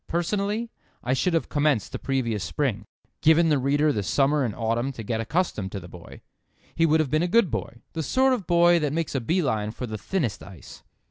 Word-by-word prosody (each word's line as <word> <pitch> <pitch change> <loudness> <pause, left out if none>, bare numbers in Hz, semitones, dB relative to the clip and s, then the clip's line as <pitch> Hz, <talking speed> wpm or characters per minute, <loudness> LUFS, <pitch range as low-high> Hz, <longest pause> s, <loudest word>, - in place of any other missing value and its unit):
Personally, 205 +6 -1 0.3
I 125 - 0
should 165 +6 +1
have 165 - 0
commenced 145 -6 +1
the - - -5
previous 120 -7 -1
spring—given 140 - 0
the 150 -3 +3
reader 145 +3 +2
the 105 - -1
summer 140 +8 +2
and 115 -5 -2
autumn 115 +3 -1
to 115 - -7
get 110 +1 -2
accustomed 115 - -1
to 100 - -3
the 90 - -11
boy. 85 -1 -12 0.5
He 165 0 +2
would 160 +1 +3
have 150 -4 0
been 155 +1 +2
a 175 - +1
good 195 - +3
boy; 115 0 -5
the 165 - -3
sort 260 - +2
of 210 -9 -3
boy 175 0 +5
that 150 -2 -1
makes 165 -1 -2
a 135 - -1
bee 170 +10 0
line 110 -6 -1
for 115 +3 -6
the 110 -2 -6
thinnest 150 - -2
ice. 90 -10 -12
145 Hz, 215 wpm, -25 LUFS, 115-170 Hz, 0.5 s, boy